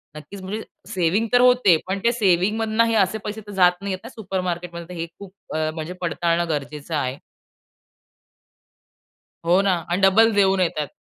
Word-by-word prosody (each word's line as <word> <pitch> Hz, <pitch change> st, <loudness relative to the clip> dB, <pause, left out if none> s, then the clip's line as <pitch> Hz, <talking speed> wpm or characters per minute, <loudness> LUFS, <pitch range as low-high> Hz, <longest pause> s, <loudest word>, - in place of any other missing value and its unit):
नक्कीच 155 Hz, +6 st, -10 dB
म्हणजे 205 Hz, +4 st, -5 dB, 0.3 s
सेव्हिंग 190 Hz, +5 st, 0 dB
तर 245 Hz, -, +6 dB
होते, 250 Hz, -8 st, +5 dB
पण 195 Hz, +1 st, -2 dB
ते 235 Hz, -, +4 dB
सेव्हिंगमधनं 215 Hz, +2 st, +2 dB
हे 230 Hz, -1 st, 0 dB
असे 200 Hz, +1 st, +2 dB
पैसे 210 Hz, +1 st, -5 dB
तर -, -, -8 dB
जात 180 Hz, -2 st, +5 dB
नाहीयेत 190 Hz, -2 st, -3 dB
ना -, -, -8 dB
सुपर 190 Hz, -4 st, -4 dB
मार्केटमध्ये 175 Hz, -1 st, -5 dB
तर -, -, -7 dB
हे 165 Hz, -, -2 dB
खूप 195 Hz, -2 st, -11 dB, 0.2 s
अ, 155 Hz, 0 st, 0 dB
म्हणजे 160 Hz, +2 st, -5 dB
पडताळणं 170 Hz, 0 st, 0 dB
गरजेचं 150 Hz, +1 st, -4 dB
आहे. 130 Hz, -2 st, -2 dB, 2.3 s
हो 180 Hz, +3 st, +4 dB
ना 195 Hz, -2 st, +2 dB, 0.2 s
अन् 180 Hz, +3 st, 0 dB
डबल 220 Hz, +4 st, +5 dB
देऊन 195 Hz, -1 st, +3 dB
येतायत. 155 Hz, -5 st, -1 dB
185 Hz, 170 wpm, -22 LUFS, 170-205 Hz, 2.3 s, तर